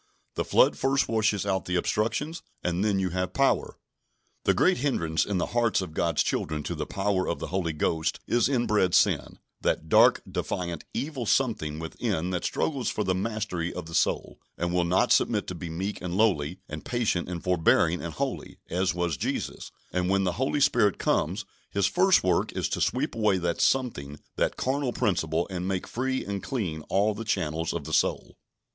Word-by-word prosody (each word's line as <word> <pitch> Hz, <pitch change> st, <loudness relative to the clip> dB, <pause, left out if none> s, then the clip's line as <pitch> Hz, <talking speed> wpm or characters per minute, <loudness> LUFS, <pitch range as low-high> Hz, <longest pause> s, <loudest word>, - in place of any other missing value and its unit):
The -, -, -1 dB
flood -, -, +4 dB
first 135 Hz, +1 st, +2 dB
washes 110 Hz, -3 st, +1 dB
out 95 Hz, -2 st, 0 dB
the 90 Hz, -, -2 dB
obstructions, 115 Hz, -, -1 dB, 0.2 s
and 90 Hz, +2 st, 0 dB
then 105 Hz, -2 st, +2 dB
you 95 Hz, -1 st, 0 dB
have 90 Hz, +1 st, -2 dB
power. 135 Hz, 0 st, +1 dB, 0.7 s
The -, -, +4 dB
great -, -, +3 dB
hindrance 85 Hz, -, 0 dB
in 100 Hz, -, 0 dB
the 90 Hz, -, +1 dB
hearts 120 Hz, -2 st, +2 dB
of 95 Hz, -5 st, -5 dB
God's 85 Hz, -1 st, +1 dB
children 75 Hz, -1 st, -2 dB
to 85 Hz, -, -3 dB
the 75 Hz, -2 st, -4 dB
power 95 Hz, -1 st, 0 dB
of 85 Hz, -, -1 dB
the -, -, -6 dB
Holy 90 Hz, -4 st, 0 dB
Ghost 80 Hz, +1 st, -1 dB
is 120 Hz, +2 st, +2 dB
inbred 105 Hz, -8 st, +2 dB
sin -, -, +2 dB, 0.2 s
that 80 Hz, -, -1 dB
dark, -, -, +6 dB
defiant, 85 Hz, -3 st, -3 dB
evil 135 Hz, -5 st, -3 dB
something 105 Hz, -, +1 dB
within 90 Hz, +2 st, -2 dB
that 90 Hz, -, -2 dB
struggles 135 Hz, -7 st, -1 dB
for 105 Hz, -, -1 dB
the 95 Hz, -1 st, +1 dB
mastery 95 Hz, -4 st, -2 dB
of 90 Hz, -, -6 dB
the 80 Hz, -, -10 dB
soul, 80 Hz, -, 0 dB, 0.2 s
and 85 Hz, 0 st, -1 dB
will 90 Hz, -1 st, +2 dB
not 90 Hz, +2 st, +2 dB
submit -, -, +3 dB
to -, -, -5 dB
be 85 Hz, -1 st, -6 dB
meek 95 Hz, +6 st, -4 dB
and 90 Hz, 0 st, -3 dB
lowly, 90 Hz, -6 st, +2 dB
and 75 Hz, 0 st, -7 dB
patient 110 Hz, -8 st, -1 dB
and 85 Hz, -2 st, -5 dB
forbearing 85 Hz, -1 st, +3 dB
and 85 Hz, -2 st, -6 dB
holy, -, -, -4 dB
as 90 Hz, +1 st, +1 dB
was 85 Hz, -5 st, -1 dB
Jesus; -, -, -3 dB, 0.2 s
and 90 Hz, 0 st, 0 dB
when 100 Hz, 0 st, +2 dB
the 90 Hz, -, +1 dB
Holy 140 Hz, +2 st, +1 dB
Spirit 110 Hz, -7 st, +3 dB
comes, 95 Hz, +6 st, 0 dB, 0.2 s
His 100 Hz, -1 st, +1 dB
first 185 Hz, -, +4 dB
work 90 Hz, -2 st, +1 dB
is -, -, -1 dB
to -, -, -2 dB
sweep -, -, 0 dB
away 105 Hz, -4 st, +2 dB
that 85 Hz, -2 st, -1 dB
something, 75 Hz, -, 0 dB, 0.2 s
that -, -, 0 dB
carnal 130 Hz, -1 st, -1 dB
principle, 80 Hz, -4 st, 0 dB
and 90 Hz, 0 st, -3 dB
make 95 Hz, -1 st, -1 dB
free 130 Hz, +2 st, -2 dB
and 100 Hz, -1 st, -3 dB
clean 90 Hz, -12 st, -3 dB
all 105 Hz, +2 st, +2 dB
the 115 Hz, -, -6 dB
channels 80 Hz, -6 st, -1 dB
of 85 Hz, -, -4 dB
the -, -, -6 dB
soul. -, -, +1 dB
95 Hz, 190 wpm, -27 LUFS, 85-110 Hz, 0.7 s, dark